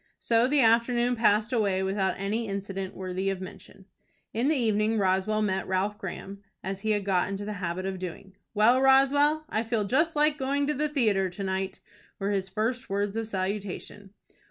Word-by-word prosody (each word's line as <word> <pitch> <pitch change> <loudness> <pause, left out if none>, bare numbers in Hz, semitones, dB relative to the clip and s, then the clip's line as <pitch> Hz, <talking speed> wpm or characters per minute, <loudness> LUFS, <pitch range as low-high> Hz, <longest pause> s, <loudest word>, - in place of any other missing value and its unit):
So 230 +1 +2
the 285 +1 +3
afternoon 240 +1 +3
passed 220 +1 +2
away 200 -5 +1
without 190 -1 0
any 215 +4 -2
incident 195 -1 -5
worthy 185 +1 -3
of 195 -1 -2
mention. 190 +1 -11 0.5
In 235 +4 +1
the 310 - +3
evening 220 -3 +1
Roswell 195 +2 +1
met 190 -2 -1
Ralph 195 +3 -1
Graham, 195 +1 -7 0.2
as 195 +1 -4
he 220 - -2
had 205 -2 +1
got 185 -2 +1
into 200 +1 -4
the 210 - -4
habit 180 +1 -3
of 190 -1 -3
doing. 185 +2 -8 0.2
"Well, 235 +5 +5
Roswell, 285 +3 +4
I 220 - -1
feel 225 -2 -1
just 310 +10 +1
like 300 0 +3
going 280 +2 0
to 300 - 0
the 300 +1 -1
theatre 215 -10 +1
to 180 +3 -7
night," 190 0 -3 0.4
were 200 +1 -2
his 195 -1 -1
first 230 +6 -2
words 200 +1 -1
of 225 -1 -2
salutation. 200 0 -4
205 Hz, 185 wpm, -27 LUFS, 195-240 Hz, 0.5 s, Well